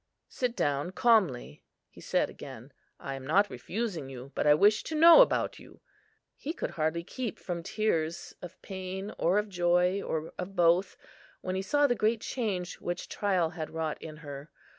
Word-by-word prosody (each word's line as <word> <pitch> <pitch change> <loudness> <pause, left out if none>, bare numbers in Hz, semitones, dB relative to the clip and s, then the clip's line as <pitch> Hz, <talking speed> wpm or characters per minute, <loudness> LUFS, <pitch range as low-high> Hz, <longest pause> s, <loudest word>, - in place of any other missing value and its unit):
"Sit 245 -2 -2
down 145 - 0
calmly," 195 - +2 0.2
he - - -16
said - - +1
again; - - -11 0.3
"I 135 - -5
am 135 -1 -7
not 190 +9 +2
refusing 185 - -4
you, 130 +1 -9
but - - 0
I 150 - +7
wish 210 +5 +4
to 315 - -4
know 335 +8 +9
about - - +2
you." - - -16 0.6
He 310 - -5
could - - -4
hardly 160 +1 -1
keep 240 +4 -5
from 175 -2 -5
tears, 170 -4 -1
of 175 -2 -10
pain, 190 +2 -6
or 180 +4 +3
of 210 0 +1
joy, 180 +1 +2
or 160 -3 -4
of 185 +2 -5
both, 175 +2 +3 0.4
when 185 - -3
he 190 - -1
saw 290 +8 +2
the 260 - +3
great 220 -1 +1
change 195 -8 -3
which 175 +1 -4
trial 185 -5 0
had 155 -2 -5
wrought 160 -1 -3
in 155 -1 -8
her. 140 +2 -8
180 Hz, 180 wpm, -29 LUFS, 160-215 Hz, 0.6 s, know